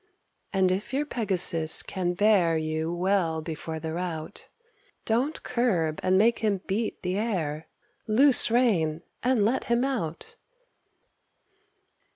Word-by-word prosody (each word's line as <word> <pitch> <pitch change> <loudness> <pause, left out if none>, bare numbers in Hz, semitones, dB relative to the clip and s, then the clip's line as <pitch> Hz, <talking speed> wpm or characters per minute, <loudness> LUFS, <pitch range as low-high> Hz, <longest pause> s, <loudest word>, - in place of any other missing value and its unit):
And 190 -2 +2
if 210 +7 -3
your 290 +2 0
Pegasus 185 - +2
can 180 -2 -3
bear 185 -5 +3
You 155 +1 -2
well 175 -2 0
before 160 0 -6
the 160 0 -5
rout, 165 -3 -5 0.6
Don't 250 +8 -1
curb 190 -11 0
and 185 0 +2
make 230 +4 +3
him 205 -4 -1
beat 215 +3 -3
the 185 +2 -1
air; 165 -9 -3 0.4
Loose 255 +5 +5
rein, 180 -10 +1 0.2
and 245 -4 +2
let 240 +5 0
him 235 +1 +1
out. 210 - -4
190 Hz, 125 wpm, -26 LUFS, 165-230 Hz, 0.6 s, Loose